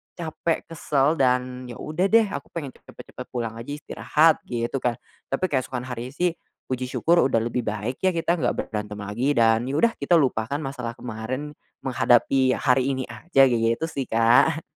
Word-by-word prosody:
capek, 165 -1 -2
kesel 150 -1 +1
dan 125 -1 +1
ya 120 - -8
udah 155 - -1
deh 225 +2 +5
aku - - -5
pengen 145 -6 -4
pe - - -23
cepat - - -13
cepat 125 - -8
pulang 120 -3 -3
aja 115 - -9
istirahat 155 +1 +2
gitu 120 +2 -2
kan. 120 -2 0 0.3
Tapi 135 +7 -3
keesokan 130 -2 -1
harinya 125 +1 -6
sih, 175 +1 +1 0.4
puji 130 0 -2
syukur 170 +6 +2
udah 115 -4 +2
lebih 120 0 -3
baik 110 +4 -3
ya 185 -2 +1
kita 170 +1 0
gak - - 0 0.2
berantem 105 -1 -4
lagi 120 +8 -1
dan 115 +1 +3
ya 135 - -2
udah 235 +9 +3
kita 155 +5 +3
lupakan 130 -5 +1
masalah 125 -4 -5
kemarin, 125 +5 -5 0.3
menghadapi 130 0 +3
hari 130 0 +2
ini 130 - -3
aja 135 +1 +3
gitu 115 +3 +2
sih 135 -2 -3
Kak. 120 +8 +4
130 Hz, 180 wpm, -24 LUFS, 120-150 Hz, 0.4 s, deh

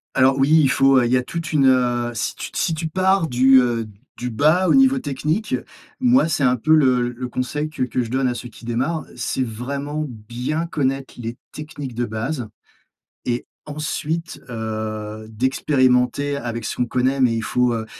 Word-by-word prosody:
Alors 130 +1 +4
oui, 135 +2 +3
il 135 - +3
faut 135 -1 +4
il 120 - 0
y 130 - +5
a 125 - 0
toute 165 +3 -5
une, 140 -3 +4
heu, 120 -2 +2
si 110 - -3
tu - - -6
si 165 - 0
tu 160 +1 -3
pars 190 +1 +2
du, 130 0 +5
heu, 115 -2 -1 0.3
du 125 - -3
bas 155 +10 +3
au - - +4
niveau 270 0 +5
technique, 155 - -1 0.4
moi, 255 -5 +4
c'est 155 -3 0
un 125 0 +4
peu 155 +7 +2
le 125 -5 +3
le 125 +1 -6
conseil 145 +5 -3
que 130 - -3
que 125 0 -1
je 115 - -4
donne 130 +1 +1
à 125 - 0
ceux 120 0 -7
qui 120 - -14
démarrent. 130 +8 -1
C'est 130 - -1
vraiment 140 +6 -4
bien 125 +7 -4
connaître 135 -5 -2
les 120 0 -6
techniques 145 -4 -7
de 120 +1 -1
base 115 +3 -3 0.8
et 120 0 -1 0.2
ensuite, 155 +2 -4
heu, 110 -1 -5
d'expérimenter 130 +3 +1
avec 115 -4 -4
ce - - -3
qu'on 125 - +1
connaît, 130 +3 0
mais 120 -2 +4
il 115 - -2
faut, 125 -1 +1
heu, 110 -1 -3
130 Hz, 190 wpm, -21 LUFS, 120-150 Hz, 0.8 s, y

